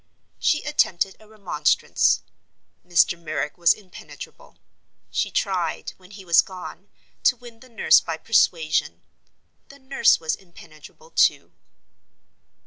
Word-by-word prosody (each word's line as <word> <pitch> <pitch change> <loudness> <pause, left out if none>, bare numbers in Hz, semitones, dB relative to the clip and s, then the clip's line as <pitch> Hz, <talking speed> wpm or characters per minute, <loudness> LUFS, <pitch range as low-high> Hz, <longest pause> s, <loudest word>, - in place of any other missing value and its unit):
She 300 - +1
attempted 215 - 0
a 215 - -19
remonstrance—Mr. 175 -2 -1
Merrick 155 -2 -4
was 170 -2 +4
impenetrable. 195 -4 -9 0.5
She - - -1
tried, - - -2
when 185 -1 -19
he 195 -1 -12
was 170 -1 +6
gone, 190 +1 -11 0.3
to 250 - +3
win 235 -1 -14
the 255 - -17
nurse 230 - +4
by - - -5
persuasion—the 385 -10 -2
nurse 265 0 +2
was 160 -1 -2
impenetrable, 170 - -17
too. - - +2
195 Hz, 110 wpm, -23 LUFS, 170-245 Hz, 0.5 s, was